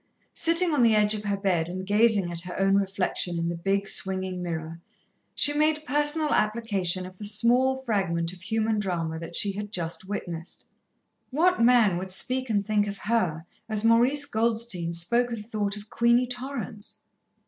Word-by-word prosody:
Sitting 335 0 +3
on 285 - +2
the 230 -2 +4
edge 210 0 +4
of 210 -1 -5
her 200 -1 -1
bed 180 -4 0
and 185 +1 -5
gazing 205 -3 +3
at 170 -1 -1
her 180 0 -7
own 195 0 +2
reflection 190 -3 0
in 170 0 -1
the 170 - -3
big, 195 +3 -1
swinging 185 -1 -1
mirror, 165 -1 -5 0.5
she 290 - +4
made 305 +1 +1
personal 295 +2 +2
application 200 -5 0
of 185 0 -12
the 210 - -6
small 245 +5 +2
fragment 180 -7 -1
of 180 - -14
human 220 +2 -1
drama 165 -5 -3
that 170 +1 -8
she 200 - +3
had 205 +1 -6
just 170 -2 -3
witnessed. 175 -4 -6 0.6
What 335 +3 +2
man 230 -7 +4
would 185 0 -7
speak 255 +6 -1
and 205 -2 0
think 210 -1 +1
of 200 0 -5
her 180 -8 -1 0.2
as 215 -1 0
Maurice 245 +6 +3
Goldstein 220 -7 -1
spoke 235 +9 +1
and 215 -3 -6
thought 210 -2 -2
of 210 +1 -12
Queenie 235 +1 +3
Torrance? 245 -5 -5
205 Hz, 175 wpm, -26 LUFS, 185-235 Hz, 0.6 s, the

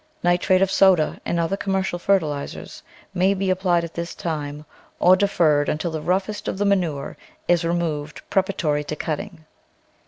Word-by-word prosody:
Nitrate 180 +2 +3
of 195 - 0
soda 190 -5 +3
and 170 - 0
other 170 +3 0
commercial 190 -2 -2
fertilisers 160 -7 -1 0.3
may 190 +2 +2
be 190 -1 0
ap 185 - 0
plied 175 -3 +2
at 170 - -7
this 170 0 -5
time 150 -2 -4 0.3
or 180 +1 +6
deferred 165 -7 +2
until 160 +3 -2
the 160 -1 -4
roughest 190 +5 -1
of - - -2
the 205 - 0
manure 175 -8 0 0.3
is 175 -1 +3
removed 165 -3 -2
preparatory 175 -6 0
to 155 - -4
cutting. 165 +1 -5
175 Hz, 160 wpm, -22 LUFS, 155-190 Hz, 0.3 s, or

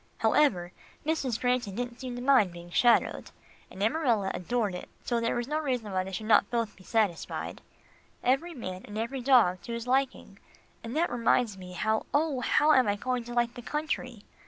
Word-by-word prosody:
However, 180 -12 +2 0.3
Mrs. 280 -7 -1
Granton 245 -6 0
didn't 240 +1 -4
seem 255 -2 -5
to 245 - -6
mind 255 -9 +4
being 175 0 -11
shadowed, 240 +5 +3 0.4
and 195 - -5
Amarilla 230 -6 +1
adored 215 +2 -1
doing 180 - -6
it, - - -14 0.2
so 240 -1 0
there 230 - 0
was 240 0 -2
no 305 +2 -1
reason 250 -8 -2
why 185 -1 0
they 190 - -7
should 195 +3 -5
not 215 -2 +4
both 230 -3 -1
be 190 - -17
satisfied. 205 -4 -1 0.6
Every 295 +7 +1
man 185 -7 -6
and 210 - -8
every 240 +4 -3
dog 235 -9 +4
to 235 - -6
his 235 0 -4
liking, 260 -6 -1 0.4
and 230 +5 -4
that 340 +2 +1
reminds 235 -2 +2
me, 180 -1 -10
how, 220 +4 0
oh! 295 -3 +1
how 295 +5 +3
am 260 -4 +4
I 205 - +2
going 250 +3 -2
to 240 - -7
like 240 0 +1
the 245 - -8
country? 255 -5 -3
235 Hz, 200 wpm, -29 LUFS, 205-255 Hz, 0.6 s, mind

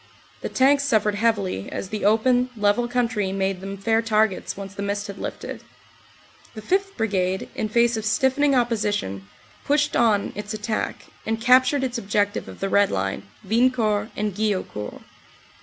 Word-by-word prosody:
The - - -3
tanks 275 +2 +3
suffered 215 -6 +2
heavily, 205 - 0
as 190 - -5
the 210 -1 -3
open, 245 +4 +3
level 210 +3 +2
coun 245 0 +1
try 210 -5 -2
made 195 -1 -1
them 195 +1 -6
fair 225 +3 +1
targets 215 -4 0
once 195 -1 -7
the 200 - -6
mist 200 0 -2
had 200 -1 -8
lifted. - - -6 0.9
The 215 - -7
5th. 390 - 0
Brigade, 190 -4 -1
in 215 - -3
face 235 +1 +3
of 220 - -3
stiffening 265 +5 +2
opposition, 205 - -1 0.4
pushed 295 +1 +1
on 215 -4 +2
its 210 +1 -5
attack, 215 +1 -3 0.2
and 225 0 -2
captured 255 +4 +4
its 250 -2 -2
objective 205 0 -1
of - - -11
the 195 - 0
Red 200 +1 +3
Line, 95 0 -3 0.2
Wiencourt 220 -2 +2
and 210 -1 -1
Guillaucourt. 195 - -3
215 Hz, 160 wpm, -23 LUFS, 200-240 Hz, 0.9 s, captured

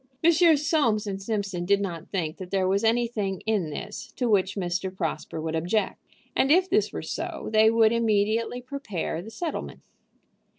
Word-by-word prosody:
Messrs. 325 -2 +5
Soames 230 -10 +2
& - - -11
Simpson 195 -4 -2
did 200 +2 +3
not 175 -5 -5
think 165 -5 -2
that 185 -1 -8
there 190 -1 +1
was 195 +3 +1
anything 225 -4 0
in 210 -7 0
this 215 +9 -7
to 250 - 0
which 200 -3 +2
Mr. 185 0 -2
Prosper 160 -3 -4
would 160 0 -3
object, 180 +7 -1 0.3
and 270 - +3
if 365 +3 +5
this 410 +3 +2
were - - -5
so, - - -4
they 220 0 +6
would 225 -1 +4
immediately 230 +1 +1
prepare 230 - -4
the 210 - -9
settlement. 325 +7 -5
210 Hz, 170 wpm, -26 LUFS, 185-235 Hz, 0.3 s, they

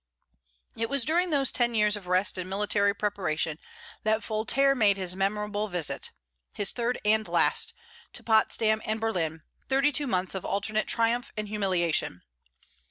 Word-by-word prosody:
It 225 0 -2
was 280 -4 +1
during 350 +5 +2
those 280 -4 +2
ten 240 -1 0
years 210 -1 +3
of 200 -3 -8
rest 185 +2 +1
and 185 0 -5
military 200 +1 +2
preparation 165 -7 -1 0.4
that 220 0 +1
Voltaire 235 +6 +2
made 210 -6 +3
his 185 -2 -2
memorable 210 +2 -1
visit 175 -5 -2 0.4
his 205 - -1
third 240 +1 -2
and 215 0 +3
last 460 - +1 0.4
to - - -8
Potsdam 220 -1 +2
and 215 +1 -2
Berlin, 165 -8 -2 0.3
thirty 275 +2 +3
two 290 +1 -2
months 185 -4 0
of 190 - -4
alternate 215 +2 -1
triumph 235 +1 0
and 210 -1 -3
humiliation. 180 - 0
210 Hz, 155 wpm, -28 LUFS, 190-230 Hz, 0.4 s, years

